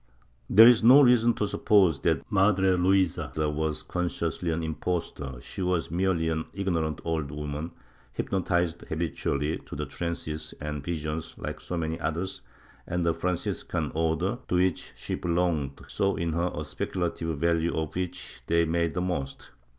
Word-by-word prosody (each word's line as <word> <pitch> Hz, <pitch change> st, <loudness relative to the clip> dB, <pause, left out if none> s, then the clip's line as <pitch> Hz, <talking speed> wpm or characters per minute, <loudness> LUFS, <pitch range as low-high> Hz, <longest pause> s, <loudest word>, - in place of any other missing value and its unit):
There 110 Hz, +4 st, +9 dB
is 120 Hz, -2 st, +6 dB
no 130 Hz, +5 st, +9 dB
reason 120 Hz, -2 st, +5 dB
to 105 Hz, -, 0 dB
suppose 100 Hz, -7 st, +3 dB
that -, -, +1 dB
Madre 95 Hz, -1 st, +4 dB
Luisa 90 Hz, -5 st, +2 dB
was 75 Hz, 0 st, -1 dB
consciously 85 Hz, -1 st, -2 dB
an 80 Hz, 0 st, -1 dB
impostor; 80 Hz, -4 st, -3 dB
she -, -, -7 dB
was 90 Hz, -5 st, 0 dB
merely 90 Hz, -2 st, +1 dB
an 80 Hz, 0 st, -1 dB
ignorant 85 Hz, -6 st, -1 dB
old 80 Hz, -4 st, -1 dB
woman, 75 Hz, +2 st, -4 dB, 0.4 s
hypnotically 90 Hz, -3 st, -1 dB
habituated 80 Hz, -2 st, -2 dB
to 75 Hz, +2 st, -4 dB
trances 80 Hz, -1 st, -5 dB
and 75 Hz, -1 st, -4 dB
visions 80 Hz, -1 st, -4 dB
like -, -, -5 dB
so 90 Hz, -, -4 dB
many 80 Hz, -1 st, -2 dB
others, 85 Hz, +5 st, -3 dB, 0.5 s
and 90 Hz, 0 st, -1 dB
the 85 Hz, -, +3 dB
Franciscan 85 Hz, +1 st, -2 dB
Order, 80 Hz, +8 st, 0 dB
to -, -, 0 dB
which 90 Hz, -1 st, +1 dB
she -, -, -5 dB
belonged, 85 Hz, -6 st, 0 dB
saw 100 Hz, 0 st, 0 dB
in 85 Hz, -1 st, -1 dB
her 85 Hz, +2 st, +1 dB
a 75 Hz, -, -4 dB
speculative 80 Hz, +1 st, -3 dB
value 85 Hz, +1 st, +1 dB
of 80 Hz, -2 st, -2 dB
which 90 Hz, 0 st, -5 dB
they 85 Hz, 0 st, +3 dB
made 85 Hz, 0 st, 0 dB
the 90 Hz, -, 0 dB
most. 85 Hz, -7 st, -4 dB
85 Hz, 150 wpm, -27 LUFS, 80-90 Hz, 0.5 s, There